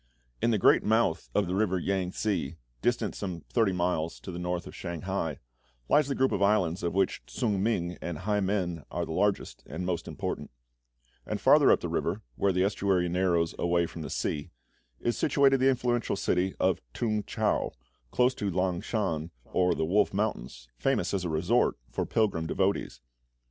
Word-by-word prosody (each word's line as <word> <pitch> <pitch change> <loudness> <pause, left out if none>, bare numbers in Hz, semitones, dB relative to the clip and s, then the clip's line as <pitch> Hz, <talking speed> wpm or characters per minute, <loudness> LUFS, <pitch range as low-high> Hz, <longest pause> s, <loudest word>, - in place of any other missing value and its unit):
In 115 - +3
the 110 - +3
great - - +5
mouth 110 - +1
of 105 - +3
the 90 - -3
river 95 -1 +1
Yang 95 0 -1
tse, 85 -8 -1 0.2
distant - - 0
some 90 -4 -5
thirty 110 -5 +3
miles 85 -3 -1
to 95 - -7
the 85 - -6
north 90 0 -2
of - - -9
Shanghai, 85 -3 -3 0.5
lies 150 -2 +4
the 140 - -1
group 130 0 +2
of 100 - -1
islands 100 -4 +2
of 85 +1 -2
which 95 -1 +1
Ts'ung 105 -5 -1
ming 90 -5 -1
and 85 -3 -4
Hai 105 +5 0
men 95 -5 -1
are - - -2
the - - -7
largest 100 +4 0
and 80 +6 -5
most 90 -2 -2
important; - - -4 0.7
and - - -3
farther - - +6
up - - +4
the - - -2
river, - - -2
where 100 - +2
the 90 0 +2
estuary 95 -3 +1
narrows 85 -2 +1
away 85 0 +2
from 85 - -8
the 75 - -5
sea, 75 -1 -2 0.5
is 120 - -1
situated 140 -3 +4
the 130 +1 +4
influential 120 -4 0
city 95 0 0
of - - +2
T'ung 110 -3 0
chau, - - 0 0.4
close 125 - +3
to 100 -5 -2
Lang 90 -1 0
shan, 85 -8 -2 0.2
or 90 -1 +1
the - - 0
Wolf 95 +3 +2
Mountains, 65 - -3
famous - - +1
as 95 -2 -1
a - - -1
resort 85 +10 +2
for - - -2
pilgrim 95 -7 +1
devotees. 95 +3 -1
95 Hz, 185 wpm, -29 LUFS, 85-105 Hz, 0.7 s, farther